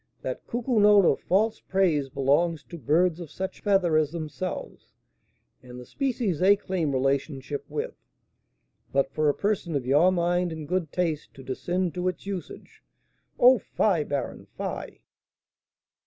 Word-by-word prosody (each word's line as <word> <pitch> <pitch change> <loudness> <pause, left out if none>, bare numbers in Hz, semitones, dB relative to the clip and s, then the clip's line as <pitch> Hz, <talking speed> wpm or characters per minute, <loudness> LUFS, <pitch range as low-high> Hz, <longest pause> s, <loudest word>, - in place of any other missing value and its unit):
That - - -5
cuckoo 240 0 0
note 205 -2 +6
of - - +3
false 215 +4 +1
praise 170 -8 +1
belongs 145 +4 +1
to 170 - -10
birds 165 +6 +2
of 170 -4 -7
such 190 +5 -6
feather 190 -6 +3
as 155 -2 +2
themselves, 165 +2 -6 0.7
and 125 0 -11
the 125 - -10
species 240 - -1
they 195 +2 +6
claim 185 -7 -2
relationship 135 +1 -1
with; 455 +3 -3 1.0
but 135 0 +1
for 155 0 +1
a 145 - +1
person 200 -6 -1
of 135 -3 -1
your 150 +8 +4
mind 175 0 +1
and 160 -2 -6
good 175 -3 -1
taste 165 -4 -2
to 135 - -11
descend 175 +7 -2
to 180 0 -2
its 180 0 -3
usage 195 -3 -7 0.6
oh, 250 0 +7
fie! 185 -5 +1
baron, 140 -3 -4
fie!" - - -5
170 Hz, 150 wpm, -26 LUFS, 145-190 Hz, 1.0 s, oh